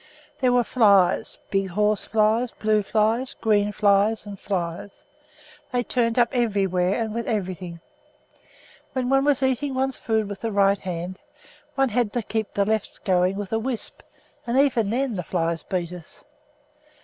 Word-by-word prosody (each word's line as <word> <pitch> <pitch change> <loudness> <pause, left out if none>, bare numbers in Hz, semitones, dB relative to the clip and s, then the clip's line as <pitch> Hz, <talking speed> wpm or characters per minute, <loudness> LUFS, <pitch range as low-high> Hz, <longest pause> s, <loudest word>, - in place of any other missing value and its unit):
There 255 -3 +3
were 245 0 +4
flies, 200 -7 +3
big 195 -1 +1
horse 210 +3 0
flies, 225 +2 +2
blue 215 -1 +1
flies, 225 +6 0
green 210 -2 +1
flies, 205 +1 +2
and 200 -2 -8
flies. 180 0 -4 0.7
They 245 -1 0
turned 230 -1 0
up 240 -1 +4
everywhere 195 -6 +1
and 220 -2 -2
with 235 0 -3
everything. 185 -5 -3 1.1
While 260 -2 -1
one 270 +2 +2
was 280 -2 +2
eating 265 +1 0
one's 265 0 0
food 220 -2 0
with 200 -1 -7
the 230 - -2
right 200 -1 +3
hand, 180 +1 -5 0.6
one 270 -1 +2
had 235 -2 0
to 240 - -1
keep 220 0 -3
the 200 - +2
left 215 0 -2
going 185 -1 +2
with 205 +1 -5
a 225 - +2
wisp, 240 0 -4 0.5
and 240 +2 0
even 245 -7 +3
then 245 -1 -1
the - - -1
flies 165 -1 -1
beat 180 -2 -3
us. 175 -2 -12
215 Hz, 160 wpm, -24 LUFS, 195-240 Hz, 1.1 s, were